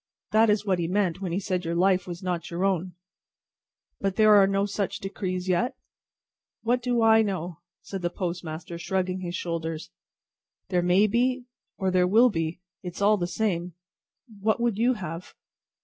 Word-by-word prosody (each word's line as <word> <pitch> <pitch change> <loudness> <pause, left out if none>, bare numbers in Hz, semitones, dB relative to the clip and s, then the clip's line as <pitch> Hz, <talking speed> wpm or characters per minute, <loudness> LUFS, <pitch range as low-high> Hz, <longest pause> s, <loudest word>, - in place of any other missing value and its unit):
That 220 +1 +5
is 210 0 +2
what 190 -3 +1
he 170 - -1
meant 185 -1 0
when 185 -3 -3
he 180 - 0
said 185 -2 -2
your 170 0 -2
life 185 +1 +2
was 175 +1 -7
not 175 -2 -2
your 175 +3 -1
own." 185 -2 -1 1.0
"But 195 -1 -1
there 215 0 +6
are 200 -2 +7
no 195 0 +1
such 200 -1 -2
decrees 185 -2 -4
yet?" 185 +8 +1 0.9
"What 245 +2 +1
do 240 -1 +1
I 225 0 +6
know!" 180 -5 -3 0.2
said 195 -2 -6
the 175 - 0
postmaster, 170 -2 -5
shrugging 185 +1 -1
his 175 -1 -4
shoulders; 165 -2 -4 0.8
"there 180 -2 +2
may 180 +4 +4
be, 245 +4 +1 0.3
or 190 -2 0
there 180 -1 +3
will 230 +6 +5
be. 165 -1 -3 0.2
It 180 -3 -7
is - - -7
all 210 +1 +5
the 175 -2 -2
same. 175 -3 -2 0.6
What 220 +3 +1
would 235 -3 0
you 245 +2 +3
have?" 175 -3 -7
185 Hz, 180 wpm, -26 LUFS, 175-210 Hz, 1.0 s, are